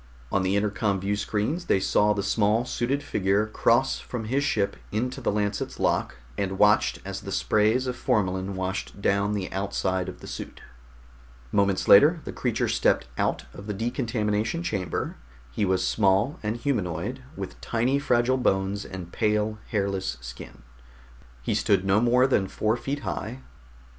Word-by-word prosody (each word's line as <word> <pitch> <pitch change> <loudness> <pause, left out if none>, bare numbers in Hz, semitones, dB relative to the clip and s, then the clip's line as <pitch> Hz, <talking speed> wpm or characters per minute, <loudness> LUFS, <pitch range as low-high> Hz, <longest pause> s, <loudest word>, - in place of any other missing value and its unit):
On 100 - +2
the 95 +1 +1
intercom 100 -1 0
viewscreens 105 - -1
they - - +3
saw 105 +2 +3
the 100 -1 0
small 105 +3 +2
suited 130 +3 -1
figure 100 -4 +1
cross 115 +4 +2
from 120 -3 -5
his 135 +6 0
ship 100 -8 0 0.2
into 125 +5 -2
the 120 - +1
Lancet's 105 0 -2
lock, - - +1 0.2
and 95 -1 -1
watched 105 +1 +4
as - - -5
the - - -7
sprays 110 +5 +2
of 125 -1 -2
formalin 95 -4 0
washed 95 +2 -4
down 100 +1 +1
the 95 -2 -3
outside 95 -1 -1
of - - -9
the - - -11
suit. - - -7 0.9
Moments 100 -2 +1
later 155 - +7
the - - -6
creature - - 0
stepped - - +2
out - - 0
of 100 - -10
the 105 - -3
decontamination 115 - -1
chamber. 95 - -3 0.3
He 100 - 0
was 95 -1 +1
small 100 +6 +2
and 110 +2 -2
humanoid, 120 - -2
with - - -7
tiny 125 +4 +1
fragile 125 -1 +2
bones 100 -4 0
and 90 -2 -8
pale, 105 0 0
hairless 100 - -1
skin. - - -10 0.8
He - - 0
stood 95 -2 +2
no 95 +2 +3
more 125 +2 +4
than 105 -8 +2
four 110 +3 0
feet 140 +4 -4
high. 125 +4 -5
105 Hz, 160 wpm, -26 LUFS, 95-120 Hz, 0.9 s, later